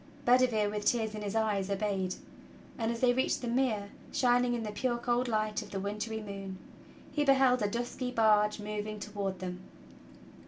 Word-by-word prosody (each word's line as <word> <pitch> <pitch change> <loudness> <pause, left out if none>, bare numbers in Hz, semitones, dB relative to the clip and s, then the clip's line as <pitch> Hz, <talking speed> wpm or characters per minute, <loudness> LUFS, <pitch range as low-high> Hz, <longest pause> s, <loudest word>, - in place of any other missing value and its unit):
Bedivere, 245 -4 +4
with 210 0 -3
tears 220 -3 +1
in 215 - -5
his 205 +1 -3
eyes, 210 -3 +1
obeyed; 195 -2 -1 0.6
and 225 -2 -1
as 230 - -4
they 250 -1 +5
reached 260 0 0
the - - -2
mere, 235 -5 0 0.2
shining 245 -1 +3
in 235 - -3
the 210 - -4
pure 240 +3 -1
cold 240 +1 0
light 215 -2 0
of - - -10
the 195 - -3
wintry 210 +3 -3
moon, 195 -2 -6 0.5
he 295 - +1
beheld 265 -3 +4
a 205 - +1
dusky 245 +3 -3
barge 215 -3 +3
moving 210 0 -4
toward 200 -2 -3
them. 180 0 -5
215 Hz, 180 wpm, -31 LUFS, 205-245 Hz, 0.6 s, they